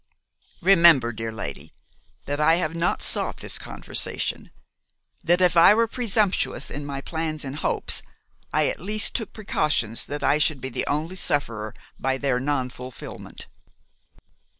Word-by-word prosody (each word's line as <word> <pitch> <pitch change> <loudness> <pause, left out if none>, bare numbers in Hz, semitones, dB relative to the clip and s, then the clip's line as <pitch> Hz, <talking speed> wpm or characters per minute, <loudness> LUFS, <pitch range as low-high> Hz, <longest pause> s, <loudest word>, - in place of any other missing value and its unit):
Remember, 170 -10 +6
dear 115 0 -5
lady, 75 -11 -7 0.5
that 145 +1 -3
I 160 +2 +4
have 165 -2 -2
not 170 0 -1
sought - - 0
this - - +1
conversation; - - -2 0.7
that 175 +2 +3
if 180 -1 +3
I 170 +5 +7
were 230 +1 +3
presumptuous 220 -4 0
in 145 0 -6
my 140 -1 -5
plans 160 -1 -4
and 135 +2 -6
hopes, - - 0 0.5
I - - +2
at - - -3
least 210 +4 +2
took 225 -4 -2
precautions 150 - -1
that 145 +1 -5
I 150 - +3
should 155 -2 +1
be 130 +1 -5
the 120 - -3
only 160 +6 -2
sufferer 115 - -1 0.2
by 135 0 0
their 135 -2 0
nonfulfilment. 130 -2 -5
150 Hz, 145 wpm, -24 LUFS, 130-175 Hz, 0.7 s, I